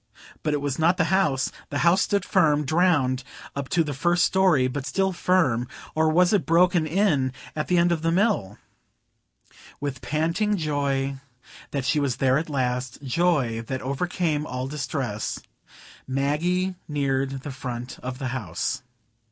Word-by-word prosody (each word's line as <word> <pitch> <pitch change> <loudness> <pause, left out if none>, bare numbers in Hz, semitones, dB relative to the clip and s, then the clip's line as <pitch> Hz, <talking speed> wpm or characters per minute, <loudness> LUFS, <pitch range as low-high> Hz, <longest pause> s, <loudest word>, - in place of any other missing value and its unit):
But 150 -1 0
it 145 - -2
was 140 -1 -2
not 170 +3 +3
the 165 - +3
house,—the 145 -5 0
house 175 +5 +4
stood 200 -2 +1
firm; 150 -5 +3
drowned 145 -5 +2 0.3
up 140 -1 -4
to 175 -3 +3
the 150 -2 -4
first 175 +5 +2
story, 180 -9 +3
but 135 +2 -4
still 190 -1 +1
firm,—or 160 -3 0
was 180 +4 +4
it 200 - +1
broken 170 -1 +4
in 155 -7 +2 0.2
at 150 - -2
the 180 - +2
end 175 0 +4
toward 165 -2 0
the 165 0 +1
Mill? 185 - +1 1.2
With 140 -3 -4
panting 165 - 0
joy 140 -3 -1 0.5
that 140 -3 -3
she 150 +3 +2
was 140 -4 0
there 130 +3 +2
at 160 - -5
last,—joy 130 0 0
that 130 -1 -3
overcame 150 +2 -1
all 125 +1 -3
distress,—Maggie 140 - -3
neared 135 -2 -1
the 145 - -5
front 125 -1 -6
of 125 0 -5
the 130 -2 -3
house. 105 -9 -3
145 Hz, 145 wpm, -25 LUFS, 130-175 Hz, 1.2 s, house